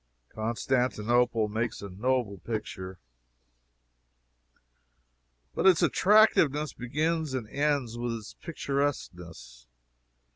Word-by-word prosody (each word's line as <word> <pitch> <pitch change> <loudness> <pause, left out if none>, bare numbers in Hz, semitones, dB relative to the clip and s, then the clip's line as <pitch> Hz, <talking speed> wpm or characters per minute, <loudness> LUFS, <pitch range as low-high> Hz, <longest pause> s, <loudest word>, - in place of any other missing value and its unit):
Constantinople 120 0 0
makes 115 +2 -3
a 100 - -7
noble 105 +1 -1
picture. 95 -4 -5 2.6
But - - +2
its 185 -4 +5
attractiveness 160 -8 +4
begins 155 +3 -2
and 120 -4 -4
ends 140 -3 -1
with 120 -1 -2
its 110 -2 -8
picturesqueness. 90 - -4
120 Hz, 80 wpm, -28 LUFS, 105-145 Hz, 2.6 s, its